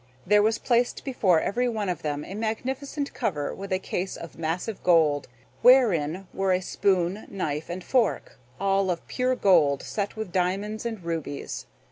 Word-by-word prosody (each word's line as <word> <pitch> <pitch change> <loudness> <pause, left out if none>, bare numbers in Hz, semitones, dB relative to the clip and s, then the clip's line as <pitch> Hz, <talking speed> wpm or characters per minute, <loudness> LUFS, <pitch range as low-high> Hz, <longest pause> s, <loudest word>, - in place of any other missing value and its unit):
There 210 +2 +5
was 220 +2 +2
placed 240 -1 +1
before 190 - +3
every 245 +4 0
one 215 -3 -2
of 175 -3 -2
them 150 -1 -3
a - - -8
magnificent 265 +7 -3
cover 150 -6 -2
with 195 0 -8
a 185 - +3
case 185 0 -3
of 165 - -9
massive 170 +6 -3
gold, 155 -5 +3 0.3
wherein 195 - +4
were 195 -1 +1
a 180 - +2
spoon, 185 +1 0
knife, 155 -5 -3
and 175 +1 -5
fork, 235 - 0 0.2
all 195 0 +2
of 170 -2 -3
pure 255 0 0
gold 150 - +4
set 205 0 -3
with 220 -4 -5
diamonds 195 +5 -1
and 220 -6 -6
rubies. 165 -4 -4
195 Hz, 165 wpm, -26 LUFS, 170-220 Hz, 0.3 s, There